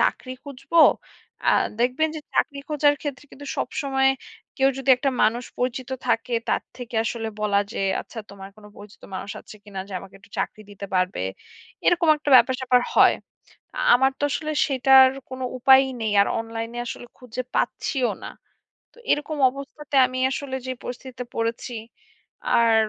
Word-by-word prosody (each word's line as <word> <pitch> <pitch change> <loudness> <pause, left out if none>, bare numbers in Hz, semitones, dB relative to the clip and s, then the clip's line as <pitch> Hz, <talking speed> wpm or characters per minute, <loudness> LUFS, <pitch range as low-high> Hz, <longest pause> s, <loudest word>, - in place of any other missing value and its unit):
চাকরি 255 - 0
খুঁজবো, 280 +3 -6 0.7
আ - - +6 0.3
দেখবেন 255 +6 +2
যে 310 - -5
চাকরি 285 -2 +1
খোঁজার 295 -1 +3
ক্ষেত্রে 290 -2 -5
কিন্তু 285 +1 -11
সবসময় 270 -1 +1 0.5
কেউ 270 0 +4
যদি 270 0 +1
একটা 270 +2 0
মানুষ 235 +3 +2
পরিচিত 255 +1 -2 0.2
থাকে, 235 +2 0 0.2
তার - - +1
থেকে 245 -2 -9
আসলে 225 -1 -3
বলা 205 -1 +2
যে, - - -5 0.2
আচ্ছা 230 - -11
তোমার 195 -1 -10
কোনো 210 -1 -14
পরিচিত 205 +2 -14
মানুষ 200 - -5
আছে - - -13
কী 210 - -16
না? - - -1
যে - - -10
আমাকে 195 - -14
একটু 230 - -21
চাকরি 215 - -3
দিতে 200 0 -8
পারবে, 185 - 0 0.7
এরকম 345 -2 +3
একটা 295 -1 -3
ব্যাপার-স্যাপার 255 -1 +3
হয়। - - +6 0.6
আ - - -4 0.2
আমার 265 +2 +3
তো - - -3
আসলে 310 +1 -2 0.2
সেটার 265 -1 +6 0.2
কোনো 260 0 -6
উপায়ই 265 +1 +6
নেই, 220 - 0
আর - - +2
অনলাইনে 225 +1 -5
আসলে 245 - -6
খুঁজে 250 0 -6
পাচ্ছিও 260 -4 0
না। - - -5 0.7
তো - - -25
এরকম 295 +1 -1
অবস্থাতে 280 +2 -8
আমি 255 - -6
আসলে 270 -1 -4
যে 260 - -1
পরিস্থিতিতে 250 0 -7
পড়েছি, 230 +2 -2 0.8
আর 230 -1 +4
255 Hz, 165 wpm, -24 LUFS, 230-275 Hz, 0.8 s, আ